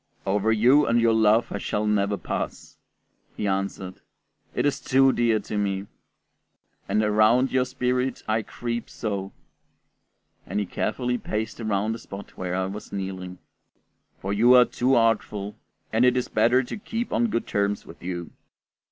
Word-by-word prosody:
"Over 105 +3 +1
you 125 +7 +5
and 120 0 +3
your 115 -1 +4
love 110 +1 +3
I 100 - -3
shall 105 +2 -2
never 100 -1 +1
pass," - - -5 0.6
he - - -2
answered, 95 -1 -3 0.5
"it - - +1
is 145 - +1
too 135 0 +4
dear 115 -2 +2
to 105 - -5
me; 100 -1 -1 1.0
and 110 - +2
around 110 +5 +3
your 130 -1 +2
spirit 125 0 -1
I 110 +1 +1
creep 120 +2 -5
so" 100 -3 -4 1.2
(and - - -2
he 105 - -1
carefully 125 +6 -2
paced 110 +1 -4
around 105 0 0
the 115 - -4
spot 100 -1 -10
where 90 -1 -3
I 95 0 0
was 100 +3 -7
kneeling), 95 -2 -5 0.8
"for 100 +1 -3
you 120 +5 +6
are 125 -1 +8
too 130 +2 +1
artful, 105 -3 +1 0.4
and 115 +2 +3
it 125 0 +4
is 125 - -1
better 120 +4 +3
to 120 - -6
keep 225 +3 -4
on 240 - +2
good 115 - -1
terms 100 0 -1
with 85 - -13
you." 85 -1 -5
110 Hz, 160 wpm, -25 LUFS, 100-125 Hz, 1.2 s, are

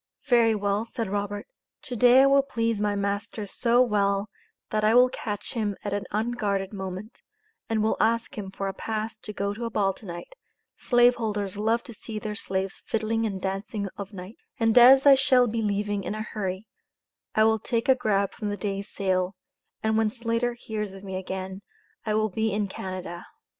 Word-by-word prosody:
"Very 235 -4 +4
well," 205 +1 0
said 230 -3 -4
Robert, 205 0 -2 0.4
"to 250 - -6
day 250 +3 +7
I - - +6
will 275 0 +5
please 230 -5 -1
my 205 -1 +1
master 200 +1 -2
so 240 +4 +3
well, 200 -2 +1 0.4
that 215 0 0
I 215 +2 +4
will 250 +1 +7
catch 210 -4 -5
him 210 -5 -1
at 205 - -2
an 200 -1 -2
unguarded 210 -3 -1
moment, 190 +3 -7 0.5
and 220 -1 +1
will 220 - +1
ask 230 +1 +1
him 200 -3 -5
for 195 +1 -4
a 195 - -3
pass 220 +2 -3
to 215 - -8
go 200 -1 -2
to 235 +3 -5
a - - -2
ball 200 -3 +1
to 195 +2 -13
night 175 - -8 0.4
(slave 245 0 +4
holders 210 -4 -2
love 225 +3 +1
to 235 - -10
see 220 0 -7
their 215 0 -4
slaves 190 -2 -3
fiddling 225 0 0
and 195 -2 -4
dancing 195 +2 -3
of 200 0 -7
nights), 190 +2 -10 0.2
and 225 -1 +3
as 260 +3 +8
I 280 - +10
shall 260 -2 +4
be 230 -1 -1
leaving 205 -1 -1
in 210 - -3
a 215 - -3
hurry, 195 -2 -4 0.7
I 215 - +5
will 220 0 +3
take 230 +1 -1
a 265 - +7
grab 200 -6 0
from 210 -3 -4
the 205 - -3
day's 200 0 -3
sale, 185 -1 0 0.5
and 220 0 +2
when 220 -1 +2
Slater 235 +1 -1
hears 210 -4 -5
of 195 0 -11
me 190 -1 -5
again, 190 +1 -5 0.5
I 215 - +1
will 215 0 +2
be 220 +3 -1
in 205 0 0
Canada." 185 -2 -6
210 Hz, 200 wpm, -26 LUFS, 200-230 Hz, 0.7 s, I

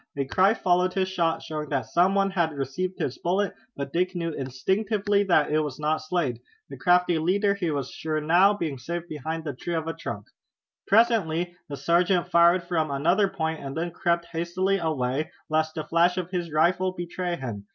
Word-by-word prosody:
A 140 - 0
cry 190 +10 +3
followed 180 -2 +1
his 190 -1 +1
shot, 170 -3 0
showing 150 -2 -5
that 135 -5 -1
some 175 - +2
one 195 0 +2
had 170 -4 0
received 140 +8 -3
his 130 - -3
bullet, 190 +4 0 0.2
but 140 -1 -5
Dick 180 +2 0
knew 170 -1 -2
instinctively 200 - 0
that 170 -6 +3
it 155 - +3
was 150 -3 -3
not 155 +1 +1
Slade, 155 -8 -2 0.3
the - - -6
crafty 180 -2 +3
leader 200 +5 +2
he 190 -4 -2
was 140 -3 -3
sure 155 -1 -2
now 175 +6 +5
being 155 -9 -3
safe 170 +6 -5
behind 160 +2 -5
the 145 -3 -4
trunk 170 +6 -3
of - - -11
a 165 - -3
tree. 115 -9 -5 0.7
Presently 190 -6 +2
the 140 - -5
sergeant 175 +4 +2
fired 170 +1 +5
from 165 -3 -1
another 170 +9 +2
point, 160 -4 -3
and 135 +2 -6
then 170 +1 -2
crept 170 0 0
hastily 185 +4 0
away 150 -3 -1 0.2
lest 155 0 +1
the 155 - -3
flash 170 +3 +2
of 180 -1 -3
his 175 -3 -3
rifle 185 +4 +2
betray 175 0 -3
him. 115 -9 -6
170 Hz, 195 wpm, -26 LUFS, 155-185 Hz, 0.7 s, now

